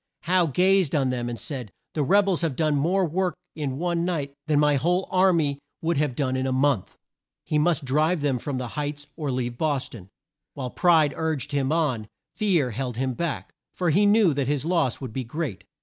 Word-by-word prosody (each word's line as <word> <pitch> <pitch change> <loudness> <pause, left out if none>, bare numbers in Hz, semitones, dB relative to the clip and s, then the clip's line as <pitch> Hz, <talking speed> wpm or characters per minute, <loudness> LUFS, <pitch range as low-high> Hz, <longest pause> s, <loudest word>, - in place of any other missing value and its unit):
Howe 175 0 +2
gazed 185 +1 +3
on 135 -3 +2
them 120 -1 -2
and 120 -2 -5
said, 125 -8 -6 0.2
"The 155 - -1
reb 195 +8 +4
els 185 -3 +1
have 160 -6 -1
done 155 0 +1
more 180 +7 +2
work 175 +1 -1 0.2
in 140 -4 -3
one 170 +1 0
night 155 -6 -2
than 150 -2 +2
my 150 -1 +4
whole 180 +7 +1
ar 185 +1 +5
my 145 -5 0 0.2
would 165 -1 +1
have 145 -4 0
done 130 -2 0
in 130 0 -1
a - - 0
month." 130 -5 +1 0.5
He 150 - 0
must 160 -2 +1
drive 155 +5 +1
them 140 -4 0
from 140 +2 -3
the 125 -2 -4
Heights, 145 0 -4
or 150 -4 -3
leave 120 -2 -2
Bos 145 -4 0
ton. 100 -5 -11 0.5
While 130 -4 -4
pride 160 -5 +4
urged 155 -3 -2
him 140 -1 0
on, 140 -10 0 0.3
fear 175 - +1
held 125 0 -4
him 130 0 -1
back, 165 +1 -4 0.2
for 175 -3 +1
he 200 +6 +4
knew 205 -5 +5
that 140 -2 -1
his 145 0 0
loss 165 -8 +1
would 130 -5 -6
be 130 - -2
great. 130 - -5
150 Hz, 210 wpm, -25 LUFS, 130-170 Hz, 0.5 s, ar